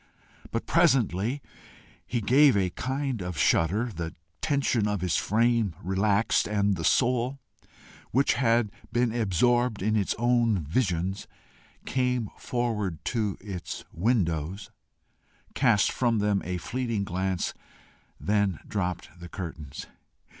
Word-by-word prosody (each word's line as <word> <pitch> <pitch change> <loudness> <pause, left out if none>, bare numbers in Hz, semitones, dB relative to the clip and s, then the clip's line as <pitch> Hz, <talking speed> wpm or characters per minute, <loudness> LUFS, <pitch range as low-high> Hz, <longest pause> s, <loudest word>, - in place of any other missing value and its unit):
But 115 - -3
presently 130 - +2 0.6
he 120 - -1
gave 130 +2 +5
a 95 -2 +1
kind 130 0 -2
of 90 -2 -5
shudder, 105 +9 +2
the 85 0 -5 0.3
tension 135 -7 +1
of 105 -3 -1
his 90 -6 0
frame 115 -3 +2
relaxed, 100 +4 +1
and 100 -1 +1
the 85 - -5
soul 125 +5 +2 0.7
which 135 +4 +3
had 115 -4 +2 0.2
been 120 -1 +1
absorbed 120 +1 +2
in 110 +1 +1
its 100 -3 +1
own 120 -5 +2
visions, 95 - -1 0.6
came 125 -4 0
forward 105 -9 -2
to 110 -5 -1
its 95 -4 -6
windows, 90 -3 -1 0.8
cast 115 -7 +3
from 120 -3 +1
them 105 -1 +1
a 90 0 -2
fleeting 115 +2 -2
glance, 95 -1 -2 0.7
then 100 -5 +1
dropped 90 -3 -3
the 90 0 -9
curtains. 80 -6 -7
105 Hz, 120 wpm, -27 LUFS, 95-120 Hz, 0.8 s, gave